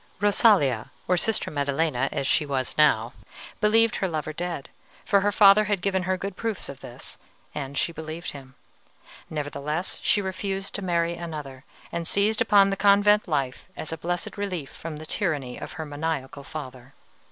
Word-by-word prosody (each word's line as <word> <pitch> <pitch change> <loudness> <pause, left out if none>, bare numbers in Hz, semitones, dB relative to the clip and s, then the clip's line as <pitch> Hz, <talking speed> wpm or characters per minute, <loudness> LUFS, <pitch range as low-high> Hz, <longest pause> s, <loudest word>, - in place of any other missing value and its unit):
"Rosalia 200 - +4 0.2
or 180 - +3
Sister 220 +4 +1
Maddelena, 140 -2 0
as 135 - -2
she 150 - +3
was 135 -3 -2
now 125 -6 +3 0.5
believed 225 +1 +3
her 190 - 0
lover 155 -2 -3
dead, 170 -3 -4 0.4
for 200 -2 +4
her 205 +1 +2
father 205 0 +7
had 205 -1 0
given 190 0 0
her 185 - +2
good 195 0 -5
proofs 225 -1 -3
of 140 - -8
this, 120 - -10 0.3
and 140 -1 -5
she - - +1
believed 160 +1 -6
him; 135 -2 -12 0.7
nevertheless 150 +3 -3
she - - +3
refused 195 0 -3
to 205 - -2
marry 170 -2 +1
another, 150 -6 -7 0.3
and 170 -1 -3
seized 210 +2 +2
upon 200 -3 +5
the - - 0
convent 205 +1 +4
life 140 -6 -2
as 155 - -4
a - - -4
blessed 175 +5 -3
relief 180 -8 -3
from 160 -2 -7
the 155 - -8
tyranny 150 - -2
of - - -7
her 160 -2 -5
maniacal 145 -2 -4
father. 135 -3 -9
165 Hz, 170 wpm, -26 LUFS, 140-195 Hz, 0.7 s, father